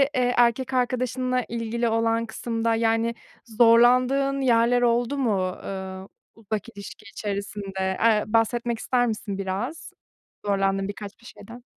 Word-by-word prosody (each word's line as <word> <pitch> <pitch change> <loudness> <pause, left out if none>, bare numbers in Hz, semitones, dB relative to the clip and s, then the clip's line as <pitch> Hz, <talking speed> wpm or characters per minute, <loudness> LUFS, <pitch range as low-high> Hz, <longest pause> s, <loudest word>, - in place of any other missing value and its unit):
eee, 250 -1 +2
erkek 245 +2 +2
arkadaşınla 255 0 0
ilgili 235 0 -2
olan 225 0 +1
kısımda, 230 0 -2
yani, 225 +1 +1 0.3
zorlandığın 250 +4 +4
yerler 245 -1 +3
oldu 240 +3 +1
mu, 195 -8 0
eee, 190 -1 -6 0.4
uzak 220 0 -5
ilişki 200 0 -11
içerisinde? 200 -2 -4
Eee, 220 -2 +4
bahsetmek 230 +1 0
ister 245 0 +1
misin 210 -3 -4
biraz, 200 +11 -4 0.5
zorlandığın 195 -1 0
birkaç 205 0 -7 0.2
şeyden? 240 +1 -12
230 Hz, 115 wpm, -24 LUFS, 205-245 Hz, 0.5 s, zorlandığın